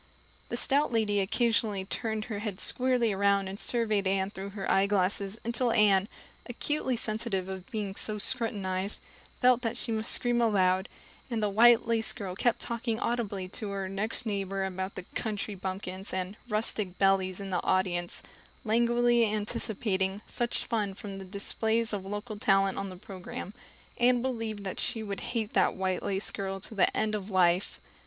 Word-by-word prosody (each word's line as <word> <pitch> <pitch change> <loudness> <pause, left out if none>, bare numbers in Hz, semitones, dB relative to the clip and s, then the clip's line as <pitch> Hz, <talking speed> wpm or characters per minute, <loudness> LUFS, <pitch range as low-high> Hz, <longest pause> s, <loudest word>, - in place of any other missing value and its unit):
The - - -2
stout 285 0 +2
lady 215 -3 +2
occasionally 210 -1 +1
turned 220 +1 -3
her 215 -4 -4
head 205 -3 -4
squarely 250 -3 +3
around 200 0 +2
and 195 +2 -6
surveyed 215 -5 +2
Anne 190 0 +1
through 195 0 -6
her 195 - -3
eyeglasses 195 +1 +2
until 235 +1 +1
Anne, 205 -3 +4 0.4
acutely 260 +1 -1
sensitive 215 -4 -2
of 190 +1 -7
being 210 -5 -3
so 215 +1 +1
scrutinized, 200 -5 0 0.4
felt 250 -1 +5
that 235 -1 -2
she 235 - -1
must 220 0 -1
scream 240 -1 +3
aloud; 190 -4 +2 0.4
and 225 -3 -1
the 210 - +2
white 235 +3 +6
lace 230 -1 +3
girl 195 -5 -5
kept 235 +4 +1
talking 235 -1 -2
audibly 210 -6 -2
to 210 +2 -5
her 195 -1 -3
next 205 +5 -1
neighbor 195 -2 -1
about 190 +1 -4
the 185 - -6
"country 215 -2 -3
bumpkins" 190 0 -5
and 185 +2 -3
"rustic 210 -3 0
belles" 190 -1 +2
in 195 -1 -6
the 180 - 0
audience, 180 -2 0 0.4
languidly 235 0 +3
anticipating 205 -1 -1
"such 240 -1 -2
fun" 210 -5 -1
from 195 -1 -7
the 190 - -8
displays 220 +3 -1
of 200 -2 -2
local 205 +2 -5
talent 195 -1 +3
on 195 0 -3
the 185 - -8
program. 190 +1 -8 0.5
Anne 245 0 +4
believed 225 -5 -3
that 190 - -4
she 225 -3 0
would 200 -2 -4
hate 230 -3 -3
that - - +3
white 185 -1 -1
lace 195 0 0
girl 195 -1 -4
to 205 - -4
the 200 - +2
end 215 0 0
of 205 -1 -3
life. 180 -1 +2
205 Hz, 170 wpm, -29 LUFS, 190-230 Hz, 0.5 s, white